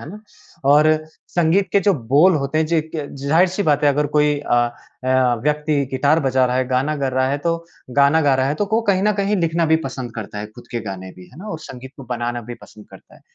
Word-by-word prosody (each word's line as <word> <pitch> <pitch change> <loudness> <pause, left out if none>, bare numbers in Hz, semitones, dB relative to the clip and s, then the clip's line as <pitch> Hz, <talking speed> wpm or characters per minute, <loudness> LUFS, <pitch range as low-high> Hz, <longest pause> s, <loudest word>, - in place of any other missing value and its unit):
है 145 - -9
ना? 210 +2 -10 0.4
और 150 +3 +5 0.4
संगीत 175 +3 +1
के 200 - +4
जो 200 -1 +2
बोल 145 +8 +3
होते 140 +1 -1
हैं 160 - +1
जो 165 +1 0
इक 160 0 -2 0.3
ज़ाहिर-सी 175 +7 +2
बात 150 -3 +1
है - - +5
अगर 150 +1 0
कोई 150 0 +2
अ, 130 - -1 0.5
ए, - - -1
अ, 130 -2 +3
व्यक्ति 150 -1 0
गिटार 145 +4 +2
बजा 130 -1 +2
रहा 125 +1 -1
है, 130 -1 0
गाना 135 +4 0
कर 135 -2 -2
रहा 130 0 +1
है 145 - -1
तो 165 0 +2 0.4
गाना 140 +3 +4
गा 140 -2 +3
रहा 130 0 +1
है 145 - 0
तो 205 - -2
को 220 +3 +1
कहीं 190 0 +1
न 210 0 +3
कहीं 200 +1 0
लिखना 165 -1 0
भी 160 +1 +4
पसंद 125 -3 -6
करता 105 -2 -7
है, 105 - -5
खुद 115 +3 -16
के 120 - -3
गाने 95 -3 -7
भी, 90 -1 -13
है - - -16
ना? 200 - -9
और 165 - -5
संगीत 130 -3 -10
को 135 - -10
बनाना 120 0 -2
भी 120 +2 -8
पसंद 105 -1 -15
करता - - -16
है। - - -19
145 Hz, 255 wpm, -20 LUFS, 130-165 Hz, 0.5 s, और